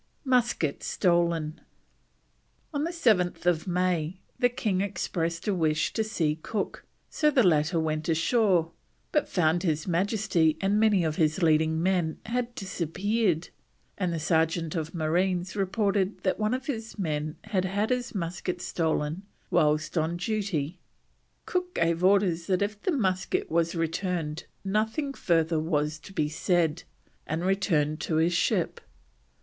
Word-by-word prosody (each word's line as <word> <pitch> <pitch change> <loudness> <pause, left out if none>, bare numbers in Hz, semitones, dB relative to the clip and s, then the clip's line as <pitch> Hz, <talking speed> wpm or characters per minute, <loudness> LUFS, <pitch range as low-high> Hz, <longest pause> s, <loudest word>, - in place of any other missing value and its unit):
MUSKET 240 - +1
STOLEN. 170 -3 +1 1.1
On 290 +1 0
7th 180 - +1
May 180 -1 0 0.2
the 245 -1 +4
king 215 -6 -1
expressed 170 -4 -2
a 205 - +2
wish 155 -4 +1
to 220 - +1
see 160 -8 -1
Cook, 210 +2 -4 0.2
so 300 - +2
the 265 -4 +4
latter 165 -1 +3
went 155 0 -1
ashore, 170 0 +2 0.4
but 300 - +1
found 170 -1 +2
his 160 -4 0
Majesty 180 -3 +1
and 200 +2 +2
many 210 -5 +4
of 155 -1 -1
his 160 +3 +1
leading 160 0 +3
men 180 -4 +1
had 240 +1 -2
disappeared, 190 0 -1 0.5
and 185 -3 -1
the 165 - -2
sergeant 160 +1 +1
of 160 +1 -3
marines 180 +3 0
reported 200 0 0
that 185 - 0
one 215 +3 +1
of 260 +1 -6
his 225 -6 -5
men 155 -5 -2
had 195 -3 -1
had 205 +5 0
his 250 -2 -1
musket 180 0 -3
stolen 160 -1 -1 0.3
whilst 155 +2 +2
on 160 +2 -1
duty. 180 -5 -2 0.7
Cook 360 -1 -2
gave 170 +1 +1
orders 185 -3 +3
that 185 +1 +2
if 205 0 -4
the 370 - 0
musket 190 - 0
was 170 +1 +1
returned 165 -1 -2 0.2
nothing 220 +8 0
further 165 - +1
was 155 -1 -1
to 175 - -13
be 155 -6 0
said, 165 +1 +1 0.5
and 160 +3 -2
returned 165 -6 +1
to 160 - -2
his 165 +2 +3
ship. - - 0
175 Hz, 140 wpm, -27 LUFS, 160-205 Hz, 1.1 s, the